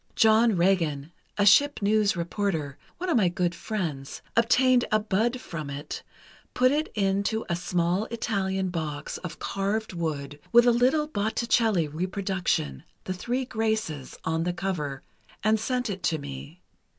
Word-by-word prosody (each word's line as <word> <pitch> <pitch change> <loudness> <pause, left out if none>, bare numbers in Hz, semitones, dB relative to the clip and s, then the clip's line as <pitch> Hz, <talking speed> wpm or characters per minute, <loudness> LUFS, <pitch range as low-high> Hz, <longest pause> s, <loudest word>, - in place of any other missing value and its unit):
John 220 0 +5
Regan, 165 -5 +1 0.3
a 205 - +3
ship 285 +8 +5
news 205 -1 +2
reporter, 170 -5 -2 0.2
one 365 - -4
of 335 - +3
my 190 -6 +4
good 175 -1 0
friends, 170 -8 -4
obtained 250 +2 +4
a 215 - +4
bud 220 +4 0
from 155 - -6
it, 140 +1 -6 0.5
put 255 0 +4
it 305 +2 +1
into 200 +2 0
a 170 - 0
small 175 +3 0
Italian 195 -5 -1
box, 155 -4 -4
of 180 - -7
carved 200 +2 -2
wood, 145 -4 -4
with 240 0 +7
a 245 - +6
little 255 +6 +3
Botticelli 220 - +1
reproduction, 180 - -2 0.2
'The 185 - -3
Three 245 +8 -2
Graces,' 220 - -2
on 160 0 0
the 175 +1 -1
cover, 150 -8 -3 0.4
and 215 +1 +3
sent 250 +2 -1
it 195 -3 -4
to 160 - +1
me. 140 +4 -9
195 Hz, 150 wpm, -27 LUFS, 165-225 Hz, 0.5 s, with